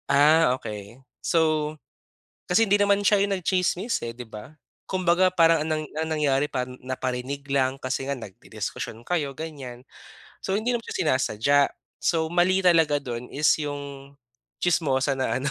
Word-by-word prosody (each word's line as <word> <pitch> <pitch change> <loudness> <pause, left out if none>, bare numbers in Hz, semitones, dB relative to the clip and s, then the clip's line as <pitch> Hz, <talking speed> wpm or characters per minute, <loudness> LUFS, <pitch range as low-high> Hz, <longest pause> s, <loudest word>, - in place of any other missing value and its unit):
Ah, 145 -2 +5
okey. 105 +2 -8 0.2
So, 155 -2 +1 0.7
kasi 180 +5 +3
hindi 205 +1 +4
naman 200 0 +3
siya 205 -1 +4
yung 200 -1 0
nagtsismis, 185 +4 0
eh, 115 - -4
'di 125 0 -9
ba. 110 +7 -10 0.3
Kumbaga 185 0 +2
parang 165 -3 +4
ang 155 - -4
nang 155 0 0 0.2
ang 160 0 -1
nangyari 140 -1 +2
pa 125 -2 -2
naparinig 130 +2 -5
lang 135 -1 +1
kasi 135 0 -3
nga 140 - -1
nagdidiskusyon 110 +1 -7
kayo, 160 -6 0
ganyan. 135 -6 -7 0.6
So 190 - -1
hindi 220 +4 0
naman 240 -1 -2
siya - - -4
sinasadya. 135 -1 +2 0.4
So, 160 -2 +1
mali 175 +3 +2
talaga 165 -5 +4
dun 125 -3 -6
is 150 +3 +1 0.2
yung 140 -1 -7 0.4
tsismosa 140 -6 +1
na 130 -1 -1
ano, 135 - -3
145 Hz, 155 wpm, -25 LUFS, 130-175 Hz, 0.7 s, Ah